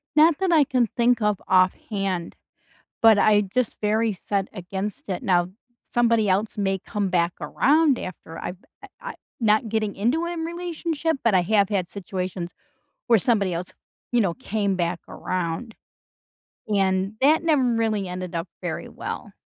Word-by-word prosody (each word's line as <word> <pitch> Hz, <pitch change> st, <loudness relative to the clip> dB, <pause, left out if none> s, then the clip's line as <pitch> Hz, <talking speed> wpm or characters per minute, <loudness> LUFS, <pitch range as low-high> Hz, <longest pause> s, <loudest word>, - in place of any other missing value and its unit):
Not 310 Hz, 0 st, +6 dB
that 380 Hz, -2 st, +1 dB
I 310 Hz, -3 st, +6 dB
can 250 Hz, -3 st, +1 dB
think 240 Hz, -1 st, +3 dB
of 210 Hz, -2 st, +1 dB
offhand, 185 Hz, -1 st, +1 dB, 0.7 s
but 220 Hz, -2 st, +7 dB
I 210 Hz, -1 st, +5 dB
just 255 Hz, -3 st, 0 dB
very 215 Hz, +1 st, +1 dB
set 195 Hz, +1 st, -2 dB
against 195 Hz, +1 st, -5 dB
it. 185 Hz, -, -3 dB
Now, 175 Hz, -1 st, +2 dB, 0.3 s
somebody 230 Hz, -3 st, +2 dB
else 205 Hz, +4 st, 0 dB
may 195 Hz, -1 st, 0 dB
come 205 Hz, 0 st, -3 dB
back 170 Hz, -1 st, +2 dB
around 295 Hz, -1 st, +3 dB
after 165 Hz, -2 st, -8 dB
I've 180 Hz, -, -5 dB, 0.3 s
I -, -, -11 dB
I -, -, -6 dB, 0.3 s
not 220 Hz, +1 st, +3 dB
getting 215 Hz, -2 st, -1 dB
into 250 Hz, +12 st, +1 dB
an 340 Hz, -1 st, -3 dB
relationship, 335 Hz, -2 st, -2 dB
but 225 Hz, -4 st, +3 dB
I 185 Hz, -, +5 dB
have 200 Hz, +1 st, +3 dB
had 190 Hz, -4 st, -1 dB
situations 185 Hz, -2 st, -5 dB, 0.5 s
where 230 Hz, -3 st, +5 dB
somebody 200 Hz, -4 st, +1 dB
else, 180 Hz, +2 st, -4 dB, 0.4 s
you 240 Hz, -, +4 dB
know, 180 Hz, -5 st, +1 dB
came 200 Hz, -1 st, -1 dB
back 170 Hz, 0 st, -1 dB
around. 185 Hz, +6 st, -3 dB, 1.0 s
And 190 Hz, 0 st, +1 dB
that 310 Hz, +4 st, +4 dB
never 310 Hz, -4 st, +3 dB
really 225 Hz, -5 st, 0 dB
ended 180 Hz, 0 st, -5 dB
up 165 Hz, -, -2 dB
very -, -, -4 dB
well. -, -, -7 dB
210 Hz, 155 wpm, -24 LUFS, 185-240 Hz, 1.0 s, but